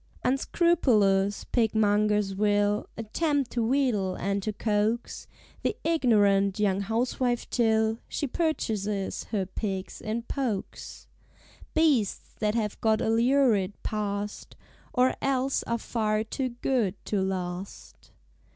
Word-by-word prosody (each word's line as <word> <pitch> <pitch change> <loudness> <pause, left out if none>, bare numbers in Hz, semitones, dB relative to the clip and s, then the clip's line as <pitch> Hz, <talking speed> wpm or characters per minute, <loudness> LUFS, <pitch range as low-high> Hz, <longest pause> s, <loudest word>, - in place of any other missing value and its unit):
_" - - -36 0.2
Unscrupulous 230 - +2
Pigmongers 210 -3 +2
will 205 +1 +1
Attempt 280 +4 -1
to 235 - 0
wheedle 225 -7 +1
and 200 +2 -1
to 215 - -2
coax 215 +2 -1 0.3
The - - 0
ignorant 205 - +3
young 200 -2 +2
housewife 240 +3 -1
till 220 -1 +2
She - - -2
purchases 215 - -2
her 200 -4 -2
pigs 190 0 -5
in 225 +2 -3
pokes; 235 -6 -4 0.7
Beasts 290 -11 +1
that 210 0 0
have 215 -3 -2
got 220 -1 +3
a 220 - 0
Lurid 230 -5 +3
Past, 205 -1 -4 0.4
Or 255 0 +3
else 270 0 +1
are 235 - 0
far 215 -2 -1
Too 255 +4 -3
Good 240 -4 0
to 205 -2 0
Last. 185 0 -5
215 Hz, 115 wpm, -27 LUFS, 200-245 Hz, 0.7 s, ignorant